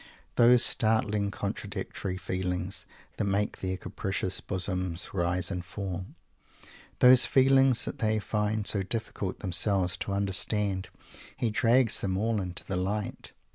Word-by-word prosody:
Those 120 Hz, 0 st, +6 dB
startling, 105 Hz, -2 st, +2 dB
contradictory 100 Hz, -2 st, -4 dB
feelings 90 Hz, 0 st, -3 dB, 0.3 s
that -, -, -1 dB
make 100 Hz, +1 st, -1 dB
their 95 Hz, 0 st, -3 dB
capricious 95 Hz, 0 st, -3 dB
bosoms 90 Hz, -2 st, -2 dB
rise 90 Hz, 0 st, 0 dB
and 90 Hz, -2 st, -3 dB
fall, 95 Hz, 0 st, -5 dB, 0.9 s
those 125 Hz, 0 st, +7 dB
feelings 135 Hz, -1 st, +4 dB
that -, -, -6 dB
they 110 Hz, -1 st, +1 dB
find 105 Hz, 0 st, -1 dB
so 100 Hz, -, +2 dB
difficult 100 Hz, -1 st, -3 dB
themselves 95 Hz, 0 st, +1 dB
to 100 Hz, -, -4 dB
understand, 100 Hz, -1 st, 0 dB, 0.5 s
he 115 Hz, -, 0 dB
drags 115 Hz, +2 st, +3 dB
them 95 Hz, -1 st, -1 dB
all 110 Hz, 0 st, 0 dB
into 90 Hz, -1 st, -4 dB
the 95 Hz, -, -3 dB
light. 100 Hz, +2 st, -3 dB
100 Hz, 130 wpm, -28 LUFS, 95-110 Hz, 0.9 s, those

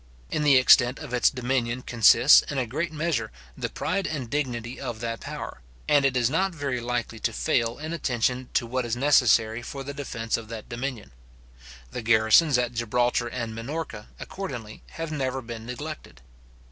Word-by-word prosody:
In -, -, 0 dB
the 145 Hz, -3 st, +6 dB
extent 130 Hz, 0 st, +5 dB
of 145 Hz, -5 st, -8 dB
its 125 Hz, -, +4 dB
dominion 125 Hz, -1 st, -2 dB
consists, 120 Hz, +3 st, +6 dB
in 140 Hz, -, -3 dB
a 130 Hz, -, +1 dB
great 155 Hz, +8 st, -3 dB
measure, 155 Hz, -8 st, -2 dB, 0.2 s
the -, -, -3 dB
pride 195 Hz, +3 st, -2 dB
and 130 Hz, -7 st, -5 dB
dignity 125 Hz, -4 st, -3 dB
of 120 Hz, -5 st, -5 dB
that 115 Hz, -2 st, -3 dB
power; -, -, -7 dB, 0.3 s
and 145 Hz, -1 st, +4 dB
it 130 Hz, -2 st, +2 dB
is 120 Hz, -2 st, +3 dB
not 185 Hz, +6 st, 0 dB
very 140 Hz, -5 st, -2 dB
likely 120 Hz, -1 st, -3 dB
to 115 Hz, -, -1 dB
fail 115 Hz, +1 st, 0 dB
in 155 Hz, +2 st, -5 dB
attention 125 Hz, -4 st, -1 dB
to -, -, +2 dB
what 125 Hz, +2 st, -2 dB
is 120 Hz, -1 st, -2 dB
necessary 120 Hz, -4 st, +3 dB
for 135 Hz, +3 st, -7 dB
the 140 Hz, +1 st, -6 dB
defence 115 Hz, -5 st, -3 dB
of 115 Hz, -1 st, -9 dB
that 110 Hz, -1 st, -8 dB
dominion. 120 Hz, -2 st, -5 dB, 0.8 s
The -, -, -5 dB
garrisons 115 Hz, +6 st, +5 dB
at 125 Hz, 0 st, -1 dB
Gibraltar 120 Hz, +1 st, 0 dB
and 115 Hz, -2 st, -4 dB
Minorca, 115 Hz, -1 st, -6 dB
accordingly, 130 Hz, -, -7 dB
have 165 Hz, -1 st, -5 dB
never 135 Hz, -3 st, -2 dB
been 115 Hz, -2 st, -8 dB
neglected. 145 Hz, -, -7 dB
125 Hz, 175 wpm, -26 LUFS, 115-140 Hz, 0.8 s, the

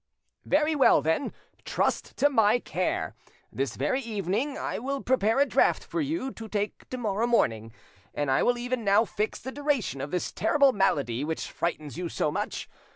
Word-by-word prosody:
"Very 300 Hz, +2 st, +2 dB
well, 270 Hz, -, +5 dB
then: 160 Hz, -, 0 dB, 0.3 s
trust -, -, -1 dB
to 290 Hz, -, +5 dB
my 225 Hz, -5 st, +4 dB
care. -, -, -2 dB, 0.4 s
This -, -, -2 dB
very 260 Hz, -, 0 dB
evening 220 Hz, -, -2 dB
I -, -, -3 dB
will 275 Hz, +3 st, -3 dB
prepare 230 Hz, -1 st, +2 dB
a 280 Hz, -, +6 dB
draught -, -, +2 dB
for 335 Hz, -, -3 dB
you 285 Hz, -2 st, -2 dB
to 225 Hz, -3 st, -9 dB
take 210 Hz, -1 st, -3 dB
to 255 Hz, -, -4 dB
morrow 220 Hz, -1 st, 0 dB
morning, 115 Hz, -, +1 dB, 0.4 s
and 145 Hz, -2 st, -1 dB
I 130 Hz, -, +3 dB
will 245 Hz, 0 st, +2 dB
even 245 Hz, 0 st, -2 dB
now 200 Hz, +2 st, +4 dB
fix 215 Hz, 0 st, -2 dB
the 260 Hz, -, -6 dB
duration 280 Hz, -, -1 dB
of 140 Hz, -, -4 dB
this 180 Hz, +2 st, -2 dB
terrible 275 Hz, +5 st, +3 dB
malady 140 Hz, -, +1 dB
which 160 Hz, +1 st, -3 dB
frightens 155 Hz, -2 st, -3 dB
you 175 Hz, -2 st, -3 dB
so 150 Hz, -, 0 dB
much. -, -, -3 dB
225 Hz, 180 wpm, -27 LUFS, 175-265 Hz, 0.4 s, a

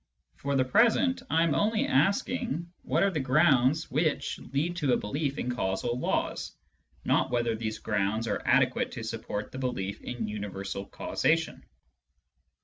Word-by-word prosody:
For 140 Hz, 0 st, -2 dB
the 130 Hz, -1 st, +3 dB
present, 235 Hz, -, +3 dB
I 165 Hz, +1 st, +3 dB
am 165 Hz, -3 st, +2 dB
only 215 Hz, +8 st, +2 dB
asking 175 Hz, -, 0 dB
what -, -, +1 dB
are 200 Hz, -, +3 dB
the 160 Hz, -, -1 dB
grounds 135 Hz, +1 st, +3 dB
which 155 Hz, +3 st, 0 dB
lead 155 Hz, +6 st, 0 dB
to 145 Hz, -6 st, +2 dB
a -, -, +3 dB
belief 140 Hz, +6 st, -2 dB
in 125 Hz, -, -2 dB
causal 120 Hz, +3 st, -1 dB
laws, -, -, -2 dB, 0.5 s
not -, -, +2 dB
whether 120 Hz, -2 st, +1 dB
these 110 Hz, -1 st, -3 dB
grounds 105 Hz, +2 st, -1 dB
are -, -, -1 dB
adequate -, -, +2 dB
to 115 Hz, -, -6 dB
support 110 Hz, -2 st, -4 dB
the 130 Hz, -, -7 dB
belief 100 Hz, -7 st, -3 dB
in 120 Hz, -3 st, -4 dB
universal 100 Hz, -1 st, -5 dB
causation. 165 Hz, +1 st, 0 dB
130 Hz, 150 wpm, -29 LUFS, 110-165 Hz, 0.5 s, the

